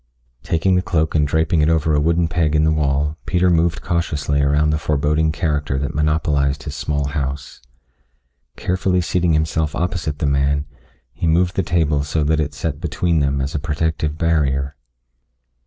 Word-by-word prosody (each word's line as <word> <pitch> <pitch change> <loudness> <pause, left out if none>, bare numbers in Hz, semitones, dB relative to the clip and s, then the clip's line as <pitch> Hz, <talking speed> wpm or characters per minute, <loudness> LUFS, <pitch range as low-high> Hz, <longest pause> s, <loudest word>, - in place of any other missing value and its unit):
Taking 80 +7 +1
the 90 - +3
cloak 80 -3 0
and 75 -2 +2
draping 80 +2 +1
it 75 - +3
over 80 -1 +2
a 75 - +3
wooden 85 +2 +2
peg 80 -3 0
in 75 - +3
the 80 - +3
wall, 75 0 0
Peter 90 0 +2
moved 85 0 +1
cautiously 75 -4 -1
around 75 +2 +2
the 75 - 0
foreboding 75 +1 +1
character 75 -5 -1
that 70 +3 -3
monopolized 75 -3 0
his 75 - -6
small 70 -2 -2
house. 70 -2 -4 1.0
Carefully 90 0 0
seating 85 0 +1
himself 80 0 0
opposite 85 -4 -2
the 75 - -2
man, 70 +1 +1 0.5
he 85 - -3
moved 90 +3 +2
the - - +2
table 80 -6 +1
so 75 +1 -1
that 75 +1 +1
it 75 -1 -2
set - - -4
between 85 -3 0
them 70 -1 0
as 70 +2 -3
a 75 - -1
protective 75 0 -2
barrier. 70 -4 0
75 Hz, 170 wpm, -20 LUFS, 70-80 Hz, 1.0 s, the